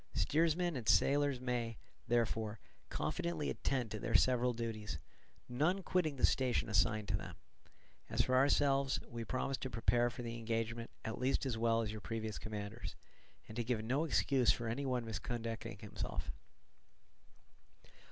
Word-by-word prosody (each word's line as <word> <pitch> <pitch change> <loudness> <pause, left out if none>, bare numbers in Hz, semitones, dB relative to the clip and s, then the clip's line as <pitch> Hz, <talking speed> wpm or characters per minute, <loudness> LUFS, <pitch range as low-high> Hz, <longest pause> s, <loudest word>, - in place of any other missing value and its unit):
Steersmen 165 +2 +2
and 120 -4 -2
sailors 140 -2 +4
may, 120 -3 -2 0.3
therefore, 115 -2 +1 0.3
confidently 170 -3 -1
attend 125 -5 -1
to 110 - -3
their 115 +1 -2
several 125 -1 +4
duties, 110 -5 -4 0.5
none 155 +10 +1
quitting 165 -6 +1
the 130 - +4
station 125 -3 +2
assigned 105 +1 +2
to 95 - +2
them: 90 -3 -6 0.7
as - - +2
for 130 - -1
ourselves, 135 0 +4
we 115 -1 -5
promise 130 +3 -1
to 130 - -4
prepare 120 +2 +2
for 120 +1 -7
the 115 0 -4
engagement 115 0 -2 0.2
at 110 - -3
least 130 +2 +1
as 130 -4 0
well 115 0 +2
as 105 - -3
your 110 -1 -6
previous 110 -1 -3
commanders, 110 +1 -5 0.5
and 110 - -9
to 120 - +1
give 115 -2 -1
no 130 +7 +1
excuse 135 -5 +3
for 115 - -2
any 135 +5 -1
one 125 -2 0
misconducting 115 -1 -4
himself. 105 0 -4
120 Hz, 150 wpm, -36 LUFS, 110-130 Hz, 0.7 s, sailors